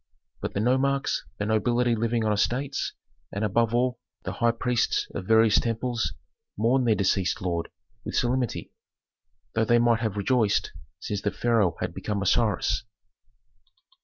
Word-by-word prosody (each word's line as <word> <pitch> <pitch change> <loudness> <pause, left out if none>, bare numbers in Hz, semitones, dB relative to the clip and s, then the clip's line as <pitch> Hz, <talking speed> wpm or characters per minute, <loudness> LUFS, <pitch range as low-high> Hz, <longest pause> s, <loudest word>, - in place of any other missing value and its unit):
But - - -4
the - - +1
nomarchs, 135 +4 +1
the 105 - -2
nobility 120 +3 +2
living 115 0 0
on 105 - +2
estates, 125 +7 -1 0.4
and 100 - -3
above 115 +2 +1
all, 125 0 +1 0.2
the - - -3
high 120 0 +1
priests 120 +1 0
of 90 - -5
various 110 -1 +5
temples 115 0 -1 0.4
mourned 120 +4 +2
their 110 - +4
deceased 95 -2 +1
lord 85 -2 -2 0.3
with - - -5
solemnity, 125 -1 -1 0.8
though 110 0 +2
they 120 +2 +4
might 120 -1 +3
have 110 -3 -2
rejoiced, 110 0 +1 0.3
since 105 -1 -3
the 105 - 0
pharaoh 110 -6 +1
had - - -2
become 105 -1 -3
Osiris. 110 +2 +1
115 Hz, 145 wpm, -26 LUFS, 105-120 Hz, 0.8 s, various